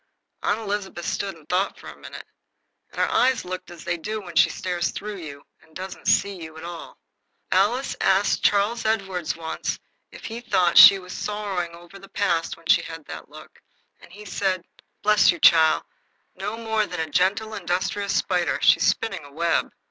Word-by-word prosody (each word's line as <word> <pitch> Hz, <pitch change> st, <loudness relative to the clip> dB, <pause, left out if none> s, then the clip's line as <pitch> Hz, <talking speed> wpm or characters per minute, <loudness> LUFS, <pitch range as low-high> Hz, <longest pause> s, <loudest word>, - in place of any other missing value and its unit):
Aunt 205 Hz, -, +1 dB
Elizabeth 200 Hz, -4 st, -4 dB
stood 195 Hz, -2 st, -3 dB
and 160 Hz, -2 st, -19 dB
thought 185 Hz, +2 st, 0 dB
for -, -, -13 dB
a -, -, -9 dB
minute, -, -, -10 dB, 0.6 s
and -, -, -10 dB
her -, -, +3 dB
eyes 255 Hz, -3 st, +2 dB
looked 185 Hz, +1 st, -6 dB
as 175 Hz, -2 st, -11 dB
they 175 Hz, -, -2 dB
do 215 Hz, +6 st, -4 dB
when 180 Hz, -4 st, -10 dB
she -, -, +6 dB
stares 175 Hz, -2 st, -2 dB
through 210 Hz, -1 st, -6 dB
you 145 Hz, -5 st, -9 dB, 0.2 s
and 160 Hz, -, -24 dB
doesn't 185 Hz, 0 st, -7 dB
see 200 Hz, -2 st, +2 dB
you 160 Hz, -1 st, -9 dB
at 160 Hz, -, -10 dB
all. 170 Hz, -1 st, -8 dB, 0.5 s
Alice 210 Hz, +8 st, +2 dB
asked 195 Hz, +1 st, +2 dB
Charles 210 Hz, +3 st, +2 dB
Edward 195 Hz, -6 st, -1 dB
once 160 Hz, -1 st, -4 dB, 0.3 s
if -, -, -12 dB
he 230 Hz, +1 st, -6 dB
thought 180 Hz, -7 st, +1 dB
she 200 Hz, -, +11 dB
was 185 Hz, -1 st, -10 dB
sorrowing 195 Hz, -5 st, -3 dB
o'er 175 Hz, +3 st, -14 dB
the 195 Hz, 0 st, -14 dB
past 170 Hz, -5 st, -1 dB
when 165 Hz, -, -20 dB
she 170 Hz, +1 st, +5 dB
had 165 Hz, -2 st, -9 dB
that -, -, -9 dB
look, -, -, -14 dB, 0.4 s
and -, -, -17 dB
he 210 Hz, +3 st, -12 dB
said: 185 Hz, -2 st, -1 dB, 0.4 s
"Bless 210 Hz, 0 st, +5 dB
you, 170 Hz, -, -5 dB
chile, 160 Hz, -1 st, +6 dB, 0.5 s
no 215 Hz, +2 st, -5 dB
more 220 Hz, -2 st, -1 dB
than 180 Hz, -, -6 dB
a 160 Hz, -2 st, -4 dB
gentle 200 Hz, +6 st, +1 dB
industrious 200 Hz, +2 st, -2 dB
spider. 180 Hz, -2 st, +1 dB
She's -, -, +4 dB
spinning 225 Hz, -8 st, -1 dB
a 145 Hz, -, -13 dB
web." 165 Hz, +3 st, 0 dB
185 Hz, 185 wpm, -24 LUFS, 170-205 Hz, 0.6 s, she